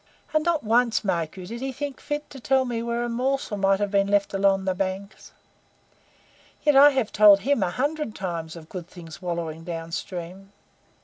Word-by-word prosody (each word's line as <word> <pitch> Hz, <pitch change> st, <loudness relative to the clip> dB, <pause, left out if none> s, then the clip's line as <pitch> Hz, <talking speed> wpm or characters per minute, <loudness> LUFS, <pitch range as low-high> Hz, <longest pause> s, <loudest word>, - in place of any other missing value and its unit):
"And 310 Hz, 0 st, +2 dB
not 340 Hz, -2 st, +1 dB
once, 230 Hz, +1 st, +2 dB
mark 170 Hz, -3 st, -2 dB
you, 185 Hz, -, -7 dB
did 230 Hz, +5 st, -7 dB
he 270 Hz, 0 st, -2 dB
think 280 Hz, +1 st, -5 dB
fit 295 Hz, 0 st, -4 dB
to 275 Hz, -, -9 dB
tell 265 Hz, +1 st, +2 dB
me 235 Hz, -2 st, -2 dB
where 235 Hz, 0 st, -2 dB
a -, -, -1 dB
morsel 255 Hz, 0 st, -1 dB
might 195 Hz, -1 st, +2 dB
have 205 Hz, -1 st, -1 dB
been 200 Hz, -1 st, +2 dB
left 200 Hz, 0 st, +1 dB
along 195 Hz, -1 st, +2 dB
the 190 Hz, -, +1 dB
banks. 195 Hz, +2 st, -5 dB, 1.3 s
Yet 295 Hz, -2 st, +4 dB
I 280 Hz, +2 st, +9 dB
have 260 Hz, -6 st, -1 dB
told 205 Hz, -2 st, +7 dB
HIM 275 Hz, 0 st, +1 dB
a 185 Hz, -, +1 dB
hundred 285 Hz, -, -2 dB
times 170 Hz, -4 st, -4 dB
of 160 Hz, -2 st, -11 dB
good 175 Hz, -1 st, -7 dB
things 165 Hz, -1 st, -11 dB
wallowing 170 Hz, -3 st, -4 dB
down 165 Hz, -1 st, -6 dB
stream. 185 Hz, +3 st, -6 dB
200 Hz, 195 wpm, -25 LUFS, 180-255 Hz, 1.3 s, I